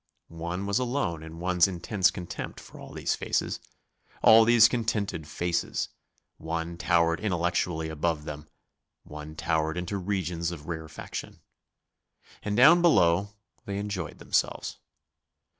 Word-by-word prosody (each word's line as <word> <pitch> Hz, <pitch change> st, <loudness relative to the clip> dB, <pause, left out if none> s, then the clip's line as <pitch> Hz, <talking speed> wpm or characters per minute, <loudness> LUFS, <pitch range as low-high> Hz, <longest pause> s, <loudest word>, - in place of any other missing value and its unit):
One 85 Hz, +4 st, -3 dB
was 100 Hz, +4 st, +1 dB
alone 120 Hz, -, -1 dB
in 80 Hz, +1 st, -9 dB
one's 90 Hz, 0 st, +3 dB
intense 95 Hz, +1 st, +1 dB
contempt 90 Hz, -3 st, -6 dB
for -, -, -13 dB
all -, -, -10 dB
these -, -, -1 dB
faces, -, -, -1 dB, 0.6 s
all 110 Hz, 0 st, +8 dB
these 115 Hz, -1 st, +7 dB
contented 110 Hz, -9 st, -2 dB
faces; 85 Hz, +2 st, -2 dB, 0.5 s
one 85 Hz, +1 st, -4 dB
towered 85 Hz, -1 st, +2 dB
intellectually 85 Hz, -4 st, 0 dB
above 80 Hz, 0 st, -1 dB
them; 75 Hz, 0 st, -7 dB, 0.6 s
one 75 Hz, +1 st, -9 dB
towered 80 Hz, +1 st, 0 dB
into 90 Hz, +3 st, -3 dB
regions 90 Hz, -3 st, -2 dB
of 80 Hz, -4 st, -8 dB
rarefaction. 80 Hz, -1 st, -6 dB, 1.0 s
And 105 Hz, 0 st, -2 dB
down 160 Hz, +8 st, +8 dB
below 100 Hz, -, +4 dB, 0.4 s
they 100 Hz, 0 st, -3 dB
enjoyed 100 Hz, -6 st, -4 dB
themselves. -, -, -1 dB
85 Hz, 125 wpm, -28 LUFS, 80-100 Hz, 1.0 s, all